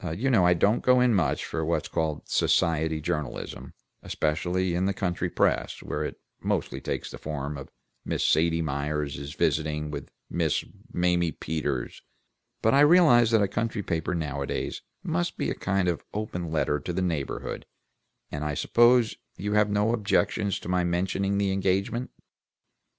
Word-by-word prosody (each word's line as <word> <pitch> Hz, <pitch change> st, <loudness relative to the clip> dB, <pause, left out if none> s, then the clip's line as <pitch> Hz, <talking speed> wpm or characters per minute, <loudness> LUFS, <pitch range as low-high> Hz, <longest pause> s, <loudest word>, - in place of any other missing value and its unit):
You 130 Hz, +6 st, +1 dB
know 95 Hz, -7 st, +5 dB
I 90 Hz, -, +5 dB
don't 100 Hz, +7 st, +2 dB
go 125 Hz, 0 st, +5 dB
in 125 Hz, -1 st, +4 dB
much 80 Hz, -9 st, +1 dB
for 80 Hz, -, -3 dB
what's 80 Hz, -1 st, 0 dB
called 80 Hz, -2 st, -2 dB
society 80 Hz, -1 st, +2 dB
journalism, 75 Hz, -2 st, -4 dB, 0.3 s
especially 90 Hz, +4 st, -1 dB
in 90 Hz, +2 st, +1 dB
the 100 Hz, -, -1 dB
country 90 Hz, -1 st, -1 dB
press, -, -, 0 dB
where -, -, -3 dB
it -, -, -5 dB, 0.2 s
mostly -, -, -1 dB
takes -, -, -4 dB
the -, -, -9 dB
form 75 Hz, -1 st, -4 dB
of 70 Hz, -1 st, -8 dB, 0.3 s
'Miss -, -, -1 dB
Sadie 80 Hz, +1 st, +3 dB
Myers 75 Hz, 0 st, -2 dB
is 70 Hz, +1 st, -7 dB
visiting 75 Hz, -1 st, 0 dB
with -, -, -6 dB, 0.2 s
Miss -, -, 0 dB, 0.3 s
Mamie 90 Hz, -2 st, +1 dB
Peters,' 75 Hz, -6 st, -3 dB, 0.6 s
but 110 Hz, -, +4 dB
I 140 Hz, -, +5 dB
realize 145 Hz, -7 st, +6 dB
that 110 Hz, -2 st, +4 dB
a -, -, +2 dB
country 115 Hz, 0 st, -2 dB
paper 85 Hz, 0 st, -1 dB
nowadays 70 Hz, -4 st, -3 dB, 0.2 s
must 85 Hz, 0 st, -1 dB
be -, -, -1 dB
a -, -, 0 dB
kind 95 Hz, -1 st, 0 dB
of 85 Hz, -2 st, -1 dB
open 90 Hz, -5 st, -3 dB
letter 75 Hz, -2 st, +1 dB
to 90 Hz, -, -5 dB
the 95 Hz, +2 st, -1 dB
neighborhood, 80 Hz, -6 st, -3 dB, 0.6 s
and 75 Hz, 0 st, -4 dB
I 75 Hz, -1 st, -2 dB
suppose 120 Hz, +3 st, +4 dB, 0.2 s
you 105 Hz, +3 st, -2 dB
have 105 Hz, 0 st, +4 dB
no 105 Hz, +2 st, +2 dB
objection 105 Hz, -1 st, +1 dB
to 95 Hz, -, -3 dB
my 90 Hz, 0 st, +1 dB
mentioning 95 Hz, +3 st, 0 dB
the 100 Hz, -1 st, +1 dB
engagement?" 95 Hz, +5 st, 0 dB
90 Hz, 165 wpm, -27 LUFS, 75-105 Hz, 0.6 s, realize